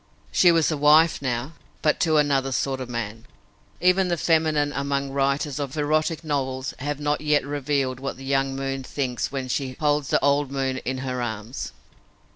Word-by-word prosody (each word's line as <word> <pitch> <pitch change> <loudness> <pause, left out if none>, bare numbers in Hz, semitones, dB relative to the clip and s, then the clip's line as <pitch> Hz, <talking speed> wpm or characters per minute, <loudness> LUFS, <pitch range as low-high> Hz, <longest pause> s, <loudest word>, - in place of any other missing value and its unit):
She 175 - +6
was 165 -1 +3
a 155 - -1
wife 150 +3 +5
now, 130 +3 -2 0.3
but 155 - +2
to 160 -2 +3
another 140 -2 +2
sort 135 0 -1
of 125 - -6
man. 115 -2 -5 0.5
Even 185 +1 +3
the 175 -1 0
feminine 155 -3 +2
among 140 0 -1
writers 140 +1 0
of 140 +1 -4
erotic 155 +2 0
novels 135 -3 -2
have 145 +2 -3
not 150 0 0
yet 150 -2 +2
revealed 140 -2 -1
what 135 -1 -4
the 135 - -10
young 135 0 +1
moon 135 0 -3
thinks 130 -2 -3
when 135 -2 -3
she 130 +1 -2
"holds 150 -2 +1
the - - +2
old 140 -1 +2
moon 135 -1 -1
in 130 +1 -3
her 125 -1 -2
arms." 110 +1 -5
140 Hz, 180 wpm, -24 LUFS, 130-150 Hz, 0.5 s, She